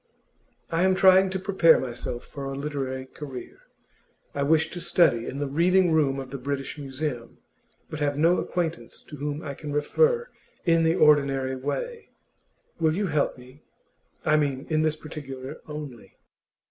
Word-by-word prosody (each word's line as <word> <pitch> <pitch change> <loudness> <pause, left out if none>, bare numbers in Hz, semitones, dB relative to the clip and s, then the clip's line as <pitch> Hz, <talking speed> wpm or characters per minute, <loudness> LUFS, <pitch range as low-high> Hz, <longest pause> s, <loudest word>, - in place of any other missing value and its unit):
'I 165 +1 +1
am 190 0 +4
trying 190 0 +6
to 190 - -2
prepare 185 -4 +4
myself 120 -1 -5
for 140 -2 -7
a 135 0 -4
literary 135 -2 -4
career. 130 -1 -9 0.7
I 140 - -2
wish 160 +2 +2
to 175 - -6
study 170 -9 +3
in 135 - -5
the 145 - -1
Reading 175 +5 +3
room 140 -4 +2
of 130 -1 -7
the 140 - -5
British 135 +1 -3
Museum, 135 -3 -5 0.5
but 155 - -7
have 145 -1 0
no 165 +4 +4
acquaintance 165 -9 -3
to 150 - -8
whom 145 +2 -4
I 140 - -5
can 150 +1 -7
refer 470 - +2 0.4
in 165 -1 +4
the 165 +1 +3
ordinary 140 -4 +3
way. 435 - -4 0.7
Will 160 -1 +2
you 205 +2 0
help 150 -7 0
me 130 +3 -15 0.6
I 155 - +4
mean, 140 -2 -1
in 155 0 +3
this 155 -1 +2
particular 140 -4 -8
only? 150 -6 -8
150 Hz, 160 wpm, -26 LUFS, 135-165 Hz, 0.7 s, trying